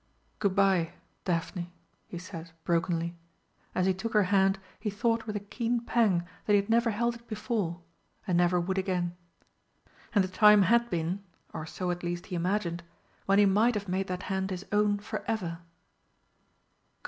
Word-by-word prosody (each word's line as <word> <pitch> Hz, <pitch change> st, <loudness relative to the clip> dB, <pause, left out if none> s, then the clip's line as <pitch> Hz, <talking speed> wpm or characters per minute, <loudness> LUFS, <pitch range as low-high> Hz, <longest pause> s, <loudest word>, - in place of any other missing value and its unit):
"Good 200 Hz, -3 st, +1 dB
bye 190 Hz, -4 st, +3 dB, 0.3 s
Daphne," 175 Hz, 0 st, -2 dB, 0.4 s
he 175 Hz, -, -7 dB
said 170 Hz, -2 st, -8 dB
brokenly. 170 Hz, 0 st, 0 dB, 0.6 s
As 185 Hz, -, +2 dB
he 190 Hz, -, +3 dB
took 220 Hz, +5 st, -4 dB
her 210 Hz, -1 st, +5 dB
hand 195 Hz, 0 st, +4 dB, 0.2 s
he 210 Hz, -, -2 dB
thought 225 Hz, +2 st, 0 dB
with 210 Hz, -, -3 dB
a -, -, 0 dB
keen 230 Hz, +4 st, -1 dB
pang 205 Hz, -9 st, +3 dB, 0.2 s
that 210 Hz, -, +4 dB
he -, -, +8 dB
had 200 Hz, +2 st, +2 dB
never 230 Hz, +1 st, +4 dB
held 235 Hz, +2 st, 0 dB
it 235 Hz, 0 st, -14 dB
before, 205 Hz, -6 st, -2 dB, 0.4 s
and 185 Hz, -4 st, 0 dB
never 175 Hz, +1 st, +3 dB
would 190 Hz, +2 st, -1 dB
again. 180 Hz, -2 st, -1 dB, 1.0 s
And 200 Hz, -, +5 dB
the -, -, -1 dB
time 210 Hz, +2 st, +6 dB
had 235 Hz, +4 st, +3 dB
been 175 Hz, +3 st, -2 dB, 0.3 s
or 155 Hz, -, -5 dB
so 180 Hz, +2 st, -2 dB
at 175 Hz, 0 st, -4 dB
least 175 Hz, 0 st, -3 dB
he 185 Hz, -, -5 dB
imagined 175 Hz, -1 st, -1 dB, 0.5 s
when 195 Hz, 0 st, +4 dB
he 205 Hz, -, +7 dB
might 215 Hz, +5 st, +4 dB
have 205 Hz, -1 st, -3 dB
made 190 Hz, +1 st, -1 dB
that 180 Hz, 0 st, -4 dB
hand 190 Hz, 0 st, -1 dB
his 185 Hz, 0 st, -5 dB
own 205 Hz, 0 st, +3 dB
for 205 Hz, -, -5 dB
ever! 180 Hz, -7 st, -2 dB
195 Hz, 175 wpm, -29 LUFS, 175-210 Hz, 1.0 s, he